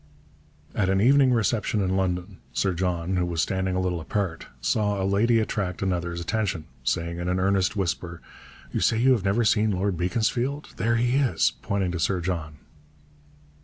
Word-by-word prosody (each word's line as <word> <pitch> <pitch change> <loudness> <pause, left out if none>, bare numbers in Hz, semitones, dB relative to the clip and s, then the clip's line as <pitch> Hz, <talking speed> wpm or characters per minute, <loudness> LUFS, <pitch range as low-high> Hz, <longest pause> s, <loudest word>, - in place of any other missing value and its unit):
At 95 -3 +1
an 95 0 +2
evening 130 +4 +5
reception 115 -2 +1
in 95 -1 0
London, 90 -2 -2
Sir 95 -2 +1
John, 90 0 -1
who 90 - +1
was 85 -1 -3
standing 95 +1 0
a - - +1
little 90 -2 -1
apart, 90 -1 -3
saw 100 - 0
a 95 - 0
lady 110 +4 +3
attract 100 -4 -2
another's 85 -2 -1
attention, 90 -2 -2 0.2
saying 85 +7 -1
in 85 - -3
an 90 +1 0
earnest 95 +2 +1
whisper, 85 -3 -2 0.5
'You - - -1
say 110 - +2
you 130 +4 +4
have 120 -6 +2
never 105 +4 +2
seen 110 0 +3
Lord 95 -1 0
Beaconsfield. 120 - -1
There 115 +4 +1
he 120 +3 +2
is,' 140 -4 +2
pointing 95 -3 -1
to 85 - -3
Sir 90 +3 +1
John. 85 -3 -3
95 Hz, 175 wpm, -25 LUFS, 90-110 Hz, 0.5 s, evening